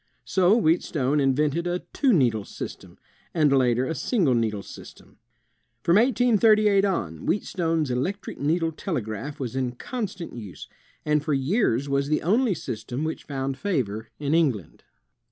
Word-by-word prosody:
So 190 Hz, +3 st, +3 dB
Wheatstone 150 Hz, -, +1 dB
invented 145 Hz, +5 st, +1 dB
a 175 Hz, +1 st, -2 dB
two 275 Hz, -3 st, +3 dB
needle 120 Hz, -, +2 dB
system, -, -, -9 dB, 0.4 s
and 150 Hz, -4 st, +4 dB
later 125 Hz, -1 st, +2 dB
a 160 Hz, -, -2 dB
single 165 Hz, -, +1 dB
needle 110 Hz, -4 st, 0 dB
system. -, -, -13 dB, 0.6 s
From 170 Hz, +3 st, +4 dB
1838 215 Hz, -4 st, +4 dB
on, 170 Hz, -, -1 dB
Wheatstone's 165 Hz, -7 st, 0 dB
electric 180 Hz, +11 st, -3 dB
needle 165 Hz, +4 st, +1 dB
telegraph 145 Hz, -, -4 dB
was 130 Hz, -2 st, -4 dB
in 130 Hz, -2 st, -1 dB
constant 195 Hz, -, -5 dB
use, 105 Hz, -6 st, -9 dB, 0.4 s
and 150 Hz, -1 st, +2 dB
for 150 Hz, -2 st, 0 dB
years 140 Hz, -, +1 dB
was 140 Hz, 0 st, 0 dB
the 150 Hz, +1 st, 0 dB
only 215 Hz, -, +2 dB
system 120 Hz, +4 st, -5 dB
which 160 Hz, 0 st, -4 dB
found 135 Hz, -1 st, -3 dB
favor 120 Hz, -, -2 dB
in 145 Hz, 0 st, -1 dB
England. 135 Hz, -, 0 dB
150 Hz, 140 wpm, -25 LUFS, 130-185 Hz, 0.6 s, and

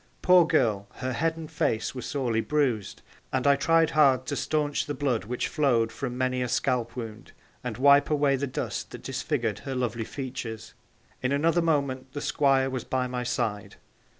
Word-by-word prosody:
Poor 180 Hz, -2 st, +6 dB
girl, 110 Hz, -11 st, +1 dB
her 130 Hz, 0 st, -4 dB
head 165 Hz, +6 st, 0 dB
and 160 Hz, -1 st, -8 dB
face 115 Hz, -7 st, 0 dB
were 130 Hz, -, -6 dB
sorely 120 Hz, -6 st, -1 dB
bruised, 125 Hz, -8 st, -1 dB, 0.3 s
and 130 Hz, -1 st, -1 dB
I 140 Hz, 0 st, +6 dB
tried 165 Hz, +3 st, +3 dB
hard 135 Hz, -4 st, +4 dB
to 145 Hz, -, -3 dB
staunch 150 Hz, 0 st, -1 dB
the 145 Hz, -, -3 dB
blood 130 Hz, -6 st, -1 dB
which 125 Hz, +3 st, -2 dB
flowed 120 Hz, -7 st, +1 dB
from 125 Hz, -2 st, -5 dB
many 130 Hz, 0 st, 0 dB
a 125 Hz, -, 0 dB
scalp 120 Hz, -1 st, 0 dB
wound, 115 Hz, -2 st, -8 dB, 0.3 s
and 120 Hz, -3 st, -4 dB
wipe 140 Hz, +2 st, +5 dB
away 145 Hz, -2 st, +3 dB
the 140 Hz, +1 st, -2 dB
dust 130 Hz, -, -4 dB
that -, -, -10 dB
disfigured -, -, -2 dB
her 135 Hz, -, -5 dB
lovely 120 Hz, -2 st, -1 dB
features. 125 Hz, -5 st, -6 dB, 0.5 s
In 130 Hz, -, 0 dB
another 165 Hz, +5 st, +2 dB
moment 140 Hz, -5 st, -1 dB
the 145 Hz, -, -4 dB
Squire 135 Hz, -3 st, +2 dB
was 130 Hz, -1 st, -3 dB
by 130 Hz, -1 st, -1 dB
my 125 Hz, 0 st, -3 dB
side. 110 Hz, -4 st, -2 dB
130 Hz, 180 wpm, -27 LUFS, 120-145 Hz, 0.5 s, Poor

